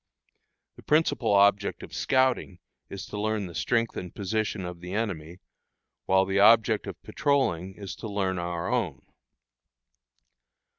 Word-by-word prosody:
The - - -12
principal 150 -7 +2
object 100 0 +3
of - - -10
scouting 130 -8 +1 0.3
is 100 - -7
to 105 - -5
learn 110 -1 -1
the 85 - -9
strength 115 +7 0
and 90 -2 -6
position 105 -1 -2
of 90 -1 -7
the 90 +2 -7
enemy, 90 -6 -4 0.7
while 95 0 +4
the 95 +1 0
object 110 +1 +5
of - - -7
patrolling 95 - 0
is 100 -2 -7
to 115 - -6
learn 95 -3 -1
our 85 0 -3
own. 90 - -1
100 Hz, 140 wpm, -27 LUFS, 90-110 Hz, 0.7 s, object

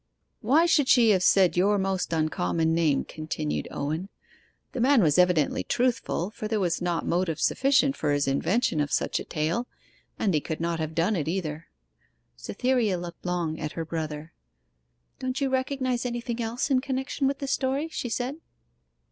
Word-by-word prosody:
'Why 280 +9 +4
should 295 -5 +3
she 235 -4 +6
have 190 -3 +3
said 185 -1 +4
your 200 +4 +3
most 190 -3 -1
uncommon 160 - 0
name?' 160 -4 +2
continued 155 -1 -4
Owen. 155 +7 -3 0.6
'The 260 - -5
man 260 -3 +5
was 150 0 +3
evidently 180 -5 +3
truthful, 240 -6 -1
for 215 - -5
there 215 0 0
was 175 -3 0
not 175 -2 -1
motive 170 -3 0
sufficient 275 0 +2
for 150 - -1
his 145 -1 +1
invention 160 - +1
of 145 -1 -1
such - - 0
a - - -5
tale, 165 +11 -2 0.5
and 200 -4 +1
he 150 - +2
could 160 - -5
not 170 0 -1
have 160 0 -4
done 170 +6 +1
it 155 -5 -2
either.' 165 -3 -3 0.7
Cytherea 230 - 0
looked 175 +1 -8
long 170 -3 -2
at 150 -1 -4
her 165 - -4
brother. 155 -1 -5 0.9
'Don't 255 0 -2
you 275 -2 0
recognize 260 -2 -1
anything 240 -1 -3
else 235 +5 -2
in 255 -1 +3
connection 265 +1 -2
with 275 0 -1
the 275 - -5
story?' 275 +3 -1
she 245 - -4
said. 250 +5 -2
185 Hz, 175 wpm, -26 LUFS, 160-255 Hz, 0.9 s, she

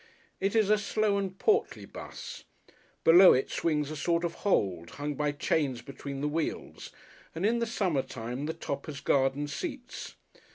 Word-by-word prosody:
It 195 +3 0
is 215 -2 +4
a 215 - +5
slow 210 0 +1
and 190 -1 -4
portly 435 - +1
'bus. - - -9 0.6
Below 180 +3 +9
it 130 - 0
swings 150 -3 0
a - - -4
sort 170 +3 0
of 170 -1 -1
hold, 90 - +1
hung 145 +1 -2
by 150 +1 0
chains 145 -3 0
between 140 0 -7
the 150 - 0
wheels, 155 +1 -3 0.4
and 170 +4 -1
in 235 +2 +2
the 235 - 0
summer 185 - +1
time 125 +4 -5
the 160 - -2
top 140 -4 -5
has 145 -2 -6
garden 140 +1 +1
seats. 255 - -6
155 Hz, 170 wpm, -29 LUFS, 140-200 Hz, 0.6 s, Below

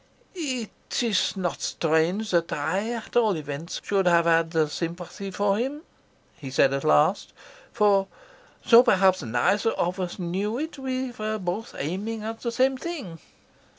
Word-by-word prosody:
"It 260 - -4
is 210 -3 +1
not 180 -3 -2
strange 170 +7 0
that 170 -2 +1
I, 185 +9 -1
at 230 -2 -6
all 220 -6 +3
events, 150 +2 -5
should 195 -2 +1
have 170 -1 +4
had 165 -2 +2
sympathy 175 +4 -5
for 200 +1 +1
him," 275 +6 -3 0.5
he 135 - -8
said 135 +1 +3
at 140 - -2
last, 75 0 +3 0.4
"for, 200 -2 +3 0.6
though 235 0 +9
perhaps 190 -6 +3
neither 120 - +1
of 180 +2 -1
us 180 -2 -3
knew 195 +5 -2
it, 310 0 -5
we 260 -1 -3
were 215 -2 -3
both 195 +3 -4
aiming 205 +9 -3
at 225 +1 -5
the 235 - -2
same 260 +2 +2
thing." 265 - -6
195 Hz, 150 wpm, -25 LUFS, 170-230 Hz, 0.6 s, though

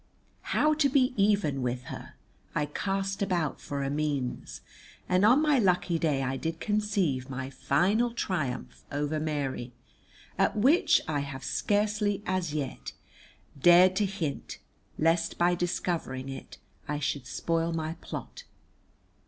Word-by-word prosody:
How 305 0 +4
to 300 -2 +2
be 255 -2 +3
even 200 -9 +2
with 125 0 -2
her? - - -9 0.4
I 150 - +1
cast 195 +6 -2
about 175 -6 -1
for 140 -1 -3
a 135 - -1
means, 145 -4 -2 0.5
and 185 +1 +3
on 250 +8 +6
my 300 -4 +4
lucky 180 -4 +2
day 145 -5 +1
I 135 0 -1
did 165 +3 -3
conceive 200 - 0
my 130 0 -5
final 195 - +2
triumph 125 - -3
over 145 +2 -1
Mary, 140 -5 -3 0.7
at - - +2
which 275 - +4
I 150 -2 0
have 140 -2 -5
scarcely 205 +1 0
as 185 -4 -1
yet 145 -3 -4 0.7
dared 180 +3 +7
to 205 -1 +2
hint, 175 -7 -4 0.4
lest 165 +1 +1
by 175 +1 +3
discovering 170 -7 -2
it 135 - -8 0.3
I 150 - -1
should 145 -3 -2
spoil 165 +3 -1
my 160 -1 -2
plot. - - -7
165 Hz, 135 wpm, -29 LUFS, 140-200 Hz, 0.7 s, dared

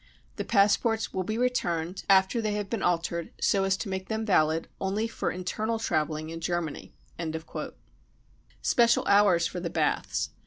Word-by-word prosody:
The - - -2
passports 220 +2 +2
will 185 - -1
be 215 +4 -3
returned 180 -8 -1
after 190 +4 +4
they 215 -1 -1
have 205 -1 -3
been 230 -4 -1
altered 170 -1 0
so 195 -1 +2
as 190 0 +1
to 215 - -5
make 190 0 -4
them 220 0 -2
valid 160 -5 +2
only 200 +4 -1
for - - -3
internal 215 +5 -2
travelling 155 -6 -1
in 165 0 -6
Germany," 170 -2 -3 1.7
Special 235 -1 +3
Hours 200 -4 +4
for 180 - -3
the 170 -1 -3
Baths. - - -1
190 Hz, 155 wpm, -28 LUFS, 170-220 Hz, 1.7 s, after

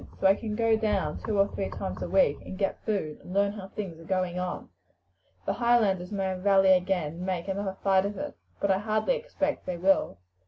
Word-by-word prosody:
So - - -2
I 190 - +8
can 210 +1 -4
go 225 0 +3
down 205 -8 0
two 215 -2 -1
or 195 0 +5
three 195 - -3
times 195 - -5
a - - -3
week 185 -7 +4
and 185 - -8
get 195 -1 -2
food, 190 -8 -1
and 180 - -9
learn 200 0 +3
how 200 -2 -8
things 190 -5 -6
are - - -11
going 185 0 -1
on. 180 0 -4 0.8
The - - 0
Highlanders 215 -7 +2
may 195 -2 -1
rally 195 0 +5
again 180 -4 +1
and - - -7
make 185 -1 -2
another 195 0 -3
fight 195 -1 +4
of 205 -1 -6
it; - - -5 0.2
but 200 - +2
I 190 - +2
hardly 215 - +1
expect 475 - -2
they 180 -1 -2
will. 190 - +2
195 Hz, 220 wpm, -28 LUFS, 185-210 Hz, 0.8 s, I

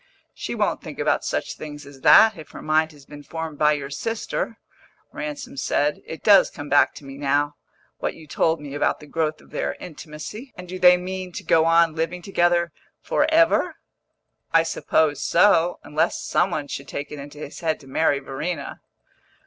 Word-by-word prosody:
"She - - -5
won't - - 0
think - - -9
about - - +1
such - - -2
things 150 -1 -8
as 140 -2 -14
that, 220 +9 +7
if 160 -2 -11
her - - -10
mind 155 +1 +2
has 145 -3 -17
been 145 0 -11
formed 160 0 -6
by 150 0 +5
your 140 -1 -4
sister," 225 +5 -3 0.6
Ransom 285 -3 -6
said. 150 - 0
"It 160 - -8
does 200 -3 +7
come 145 0 -8
back 145 - +4
to 145 - -11
me 135 0 -9
now, 145 +1 +1 0.5
what - - -2
you 160 - -13
told 160 +2 +1
me 145 -2 -8
about 145 - 0
the 150 - -12
growth 155 0 -2
of - - -21
their - - -2
intimacy. 175 - -9
And 180 0 -9
do 185 +1 -6
they 180 0 +7
mean 185 0 -5
to - - -6
go 160 0 +4
on 165 -1 +4
living 165 +2 -3
together 175 -2 +2 0.3
for - - +1
ever?" 330 +1 +3 0.8
"I 165 0 +5
suppose 160 -2 +1
so 175 -1 +4
unless 155 +1 0
some 180 - +2
one 145 -5 -3
should 140 0 -6
take 145 - -5
it 150 - -7
into 145 +1 -10
his 150 -1 -8
head 160 -2 -1
to 135 - -15
marry 145 +1 +2
Verena." 140 +5 -5
160 Hz, 190 wpm, -23 LUFS, 145-180 Hz, 0.8 s, that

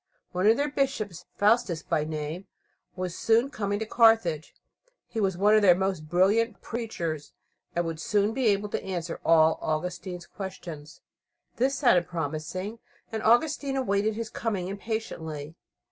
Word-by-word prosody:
One 185 +2 +1
of 225 +2 +6
their 285 - +1
bishops, 245 - -2
Faustus 205 -6 +2
by 155 -3 0
name, 155 +4 -5 0.5
was 180 -2 -4
soon 230 +5 +2
coming 205 -5 -2
to 220 - -3
Carthage. 225 -9 +3 0.5
He 225 - -5
was 190 -3 +1
one 205 +3 +4
of 215 - +6
their 185 -4 +7
most 185 -5 -2
brilliant 200 +7 +2
preachers, 170 -10 -4 0.4
and 175 0 +1
would 165 -1 -4 0.3
be 255 -1 +1
able 205 0 +2
to - - -2
answer 175 -3 -4
all 160 -1 +5
Augustine's 180 +3 -3
questions. 170 -6 -8 0.6
This 265 +3 +2
sounded 180 - +3
promising, 170 +7 -4 0.3
and 220 -1 -3
Augustine 275 +4 +2
awaited 210 -4 +1
his 225 -1 -5
coming 195 -6 -2
impatiently. 165 -8 -5
195 Hz, 145 wpm, -27 LUFS, 165-225 Hz, 0.6 s, their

